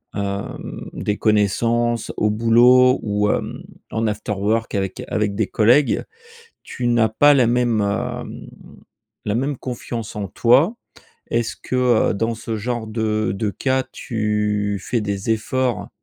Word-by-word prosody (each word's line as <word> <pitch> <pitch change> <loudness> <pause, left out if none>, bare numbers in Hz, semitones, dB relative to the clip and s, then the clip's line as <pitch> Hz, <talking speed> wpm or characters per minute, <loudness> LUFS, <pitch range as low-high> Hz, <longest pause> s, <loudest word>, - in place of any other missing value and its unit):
hem, 100 0 -5
des 105 0 -2
connaissances 115 +3 +1
au 105 - +2
boulot 120 +4 +5
ou 105 -1 0
hem, - - -2 0.3
en 110 0 0
afterwork 105 +1 -1
avec 95 -1 -3
avec 105 -2 -1
des 105 -1 0
collègues, 120 +5 +3 0.6
tu 125 - -4
n'as 120 -2 +3
pas 145 +6 +5
la 130 -4 +4
même, 120 -2 +2
hem, 120 +5 -3 0.8
la 105 - 0
même 135 +3 -1
confiance 120 -3 -6
en 105 -2 -3
toi? 130 - +3 0.6
Est-ce 115 -1 -1
que, 125 -3 +2
heu, - - 0
dans 115 +3 -1
ce 110 0 -4
genre 120 +1 -3
de 110 -2 -1
de 105 +1 -1
cas 130 +5 0
tu 105 -2 -1
fais 120 - -1
des 100 0 -3
efforts, 120 +3 -1
110 Hz, 140 wpm, -21 LUFS, 105-120 Hz, 0.8 s, boulot